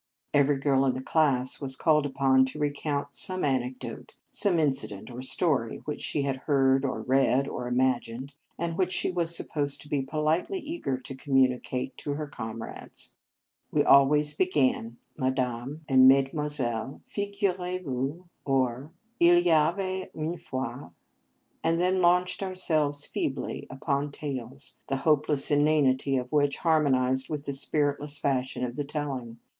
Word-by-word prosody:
Every 145 -1 +3
girl 135 -1 +2
in 130 - +1
the 130 - -5
class 135 -5 +1
was 130 -1 -1
called 150 0 +2
upon 135 -1 +3
to 130 +3 -6
recount 145 -1 -2
some 185 +3 +1
anec 130 -2 0
dote, - - -9 0.2
some 200 -5 +2
incident 135 -8 0
or 120 +1 -7
story 130 -3 0
which 150 - -4
she 145 - 0
had 135 -1 -1
heard, 135 -2 +3
or 125 -5 -2
read, 135 +1 +2
or 125 - -5
imagined, 125 +1 -1 0.2
and 170 +1 -3
which 185 -1 +1
she 185 - +2
was 170 -2 +1
supposed 145 -2 -1
to - - -10
be 145 -2 0
politely 155 - -1
eager 310 - -3
to 130 +1 -9
communicate 130 -1 0
to 145 - -4
her 150 +1 -4
comrades. 115 -5 -8 0.6
We - - +2
always 150 +2 +5
began 135 -9 0
" - - -41
Ma 130 - +1
dame 130 +3 -3
et 130 -2 +3
mesdemoiselles, 135 -2 +2
figurez 190 -3 -2
vous," 140 +5 -3 0.2
or 130 0 0 0.2
" 235 +1 -43
il 175 0 +6
y 175 -1 +2
avait 185 +4 +1
une 160 +2 -3
fois," 130 -5 -6 0.7
and 165 +1 +2
then 185 +1 +2
launched 180 +2 +2
ourselves 155 -7 0
feebly - - -4
upon 140 +1 -2
tales, 140 -2 -6
the 135 - -1
hopeless 150 -2 +3
inanity 145 -2 +2
of 125 0 -4
which 145 -2 +2
harmonized 130 -5 +2
with 150 -2 -4
the 140 - -2
spiritless 145 +1 0
fashion 130 -3 -1
of 120 -1 -3
the 145 - -2
telling. 135 -5 -5
140 Hz, 155 wpm, -27 LUFS, 130-155 Hz, 0.7 s, il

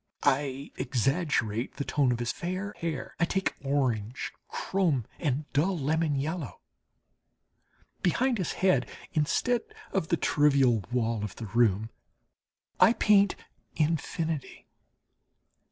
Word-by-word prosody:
I 140 0 +1
exaggerate 130 - 0
the 140 - -2
tone 140 -4 +2
of 120 - 0
his 120 0 -1
fair 185 +4 -4
hair; 165 -2 -4
I 170 - +4
take 190 +3 0
orange, 130 -5 -1 0.2
chrome, 165 - 0
and 145 -1 -1
dull 175 +7 +2
lemon 155 +1 +1
yellow. 150 +1 -3 1.4
Behind 240 +6 +2
his 180 - -1
head, 185 -10 +2 0.2
instead 195 - +1 0.3
of 190 -5 0
the 170 - +2
trivial 140 -7 +3
wall 115 -3 0
of 105 - -5
the 115 - -6
room 110 0 +2 0.9
I 225 - +7
paint 200 -4 +4 0.4
infinity. 160 -1 -2
145 Hz, 115 wpm, -29 LUFS, 125-170 Hz, 1.4 s, I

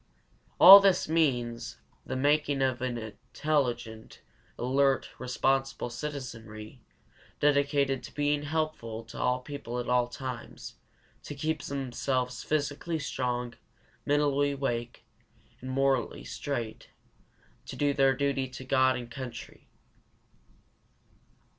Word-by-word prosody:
All 195 +3 +13
this 195 -2 +3
means 125 -8 0 0.3
the 130 - -3
making 145 0 +2
of 130 -2 0
an 125 -2 -2
intelligent, 120 0 -3 0.4
alert, 135 +2 +1
responsible 135 0 -1
citizenry, 120 -4 -7 0.6
dedicated 140 -2 +2
to - - -10
being 145 0 +1
helpful 145 -7 -3
to 115 - -10
all 125 0 +1
people 135 -3 -6
at 120 - -3
all 125 -1 +2
times, 125 -1 -7 0.5
to 145 - -8
keep 155 +1 -2
themselves 130 -2 -2
physically 150 +2 -1
strong, 125 -4 -3 0.5
mentally 145 -1 +2
awake, 120 -4 -3 0.6
morally 135 0 0
straight, 120 -6 -5 0.8
to - - -7
do 145 -1 +1
their 135 -1 +3
duty 135 -1 0
to 130 0 -10
God 130 0 +3
and 120 -1 -7
country. 125 -2 -8
135 Hz, 105 wpm, -29 LUFS, 120-145 Hz, 0.8 s, All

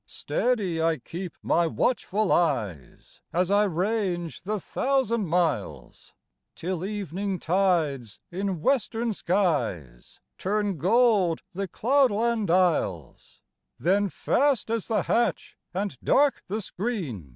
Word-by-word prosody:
Steady 200 -10 -1
I 165 -1 +2
keep 175 +3 -7
my 170 0 +2
watchful 215 +1 0
eyes, 110 - -1
As 180 +2 +1
I 205 +1 +4
range 180 -2 -1
the 210 +4 -2
thousand 235 -2 0
miles. 170 0 -2 0.4
Till 180 0 -3
evening 195 -1 -3
tides 165 - 0
in 190 -2 -3
western 235 - +1
skies 140 - -1 0.2
Turn 200 -3 -1
gold 200 - +3
the 195 +2 -3
cloudland 235 -2 +2
isles; 165 - 0 0.4
Then 195 +3 +2
fast 275 +2 +1
is 230 -3 -1
the 225 - +1
hatch 235 - 0 0.2
and 195 -3 -3
dark 285 -2 +3
the 215 +4 -2
screen. 175 - -4
190 Hz, 110 wpm, -26 LUFS, 165-215 Hz, 0.4 s, I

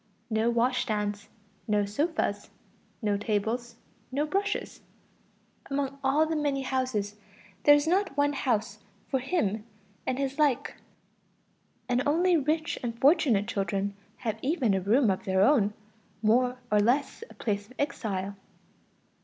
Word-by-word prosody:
No 220 +2 +2
washstands, 215 -4 0 0.4
no 210 -1 +2
sofas, 210 -2 -1 0.5
no 205 -1 +1
tables, 225 +3 -2 0.4
no 285 +3 0
brushes. 400 +5 -2 0.9
Among 275 0 -2
all 280 +4 +3
the 320 0 -2
many 285 -3 0
houses, 255 -6 -1 0.5
there 290 - +9
is 290 0 +1
not 365 -3 +1
one 285 0 +3
house 240 -6 -1 0.3
for 265 - +1
him 225 - -1 0.4
and 255 - 0
his 275 +1 -2
like, 285 -5 +2 1.1
and 245 0 +2
only 345 +4 +3
rich 310 +2 0
and 230 -1 -4
fortunate 260 - +4
children 200 0 -1 0.2
have 220 -2 -3
even 265 - +1
a 190 - +1
room 220 +4 +3
of 185 - -3
their 190 0 +3
own, 210 -4 +3 0.5
more 250 +3 +3
or 210 - +5
less 270 - +1
a - - -14
place 205 -2 -2
of 255 - -16
exile. 200 -9 -2
250 Hz, 135 wpm, -28 LUFS, 210-285 Hz, 1.1 s, there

